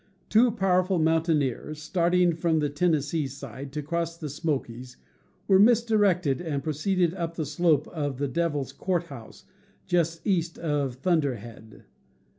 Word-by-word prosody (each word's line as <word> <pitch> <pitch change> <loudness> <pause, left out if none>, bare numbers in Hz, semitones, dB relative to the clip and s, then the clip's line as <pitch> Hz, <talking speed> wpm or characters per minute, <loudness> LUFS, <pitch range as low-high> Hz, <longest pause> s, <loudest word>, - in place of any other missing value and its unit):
Two 235 +3 +5
powerful 190 -3 +1
mountaineers 155 -3 0
starting 175 +2 +2
from 165 0 0
the 150 -1 +1
Tennes 150 -2 +1
see 155 -3 -1
side 135 0 -9
to 150 -1 -3
cross 170 +2 -3
the 155 -3 -6
Smokies 130 -5 -4 0.5
were 190 -1 +5
misdirected 205 - +3
and 145 -5 -3
proceeded 170 +3 0
up 170 -3 -4
the 160 - -2
slope 150 0 +1
of 145 -5 -3
the 140 +1 -1
Devil's 145 -3 -2
Court 175 +3 -1
House, 135 -9 -12 0.4
just 165 -2 0
east 170 -5 0
of 145 -5 -1
Thunderhead. 125 - -2
160 Hz, 140 wpm, -26 LUFS, 140-175 Hz, 0.5 s, Two